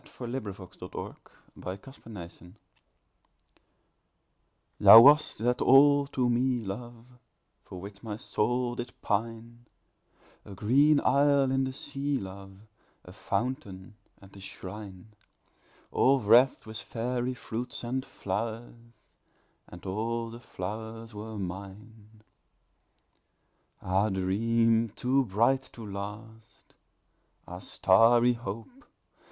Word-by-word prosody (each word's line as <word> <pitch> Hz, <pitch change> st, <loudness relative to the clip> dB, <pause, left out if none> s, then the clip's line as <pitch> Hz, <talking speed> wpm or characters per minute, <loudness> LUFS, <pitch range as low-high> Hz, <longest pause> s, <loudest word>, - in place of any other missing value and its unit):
Edgar 125 Hz, -, -10 dB
Allan 130 Hz, +3 st, -3 dB
Poe 95 Hz, -, -11 dB
To -, -, -12 dB
One -, -, -6 dB, 0.4 s
in -, -, -14 dB
Paradise 100 Hz, -4 st, -9 dB, 2.4 s
THOU 110 Hz, -, +11 dB
wast 145 Hz, +5 st, +6 dB
that 125 Hz, +1 st, +1 dB
all 140 Hz, +1 st, +6 dB
to 130 Hz, -3 st, -1 dB
me, 120 Hz, -1 st, 0 dB
love, 115 Hz, +4 st, -7 dB, 0.6 s
For 90 Hz, -, -9 dB
which 100 Hz, +2 st, -10 dB
my 105 Hz, -3 st, -6 dB
soul 120 Hz, +1 st, -1 dB
did 120 Hz, 0 st, -7 dB
pine 115 Hz, +2 st, -3 dB, 0.8 s
A 100 Hz, -, -11 dB
green 140 Hz, +9 st, +4 dB
isle 140 Hz, -1 st, +3 dB
in 135 Hz, 0 st, +1 dB
the 130 Hz, -, -3 dB
sea, 140 Hz, +1 st, -2 dB
love, 95 Hz, -2 st, -9 dB, 0.5 s
A -, -, -12 dB
fountain 110 Hz, -7 st, -4 dB, 0.3 s
and 95 Hz, 0 st, -17 dB
a -, -, -12 dB
shrine, 95 Hz, +1 st, -9 dB, 0.8 s
All 135 Hz, +1 st, +3 dB
wreathed 120 Hz, +4 st, +4 dB
with 110 Hz, 0 st, -4 dB
fairy 125 Hz, +2 st, -3 dB
fruits 120 Hz, +1 st, -6 dB
and 130 Hz, +2 st, -2 dB
flowers, 110 Hz, +2 st, -5 dB, 0.9 s
And 90 Hz, +1 st, -13 dB
all 115 Hz, +4 st, -3 dB
the 115 Hz, -, -10 dB
flowers 110 Hz, +2 st, -7 dB
were 110 Hz, +1 st, -7 dB
mine. 105 Hz, +3 st, -9 dB, 1.6 s
Ah, 95 Hz, +4 st, +1 dB
Dream 115 Hz, +4 st, +1 dB
too 130 Hz, +2 st, +1 dB
bright 120 Hz, +6 st, +1 dB
to 115 Hz, -, -9 dB
last! 105 Hz, +3 st, -9 dB, 0.7 s
Ah 90 Hz, +1 st, -8 dB
starry 115 Hz, +7 st, +4 dB
Hope! 115 Hz, -, -8 dB
115 Hz, 110 wpm, -28 LUFS, 100-125 Hz, 2.4 s, THOU